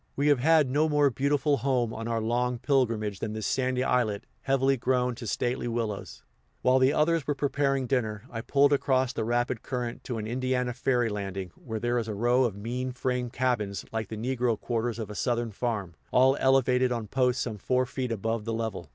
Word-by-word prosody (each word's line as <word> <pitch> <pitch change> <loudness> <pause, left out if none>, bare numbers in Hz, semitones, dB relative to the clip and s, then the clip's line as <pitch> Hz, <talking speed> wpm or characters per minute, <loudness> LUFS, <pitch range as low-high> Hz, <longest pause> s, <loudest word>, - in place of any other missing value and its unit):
We 145 +2 +2
have 145 -3 +4
had 155 +1 +4
no 150 +5 +2
more 145 -2 +3
beautiful 140 +2 +1
home 120 -2 0
on 115 +1 -5
our 115 -1 0
long 120 +2 0
pilgrimage 115 -6 0
than 110 - -3
this 110 -1 -4
sandy 130 -1 0
islet, 115 -6 0 0.2
heavily 135 0 +2
grown 125 0 +1
to 115 -1 -8
stately 120 +3 -1
willows. 115 -4 -4 0.4
While 130 +1 +4
the 130 +1 +4
others 160 +1 +1
were 145 - 0
preparing 140 -1 0
dinner, 110 -5 -1
I 115 -2 -4
pulled 140 +3 +3
across 130 -2 +1
the - - -2
rapid 120 +1 0
current 125 -2 -4
to 120 - -3
an 110 - -4
Indiana 125 +1 -1
ferry 125 -1 +1
landing, 95 -3 -4
where 110 -2 -6
there 120 +2 0
is 115 - -4
a 105 - -3
row 120 +4 +3
of 110 -5 -2
mean 125 +5 -3
frame 125 0 -2
cabins, 115 -7 -1
like 110 -2 -3
the 110 - -6
negro 120 -1 0
quarters 120 -1 -2
of 110 -3 -5
a - - -5
Southern 120 +1 -1
farm, 105 -5 -3 0.2
all 130 +2 +4
elevated 130 -1 +3
on 115 -3 -2
posts 125 +3 +1
some 110 -4 -4
four 130 +5 +1
feet 125 -1 -4
above 115 +1 -2
the 115 +1 -3
level. 115 -2 -4
125 Hz, 205 wpm, -28 LUFS, 115-130 Hz, 0.4 s, have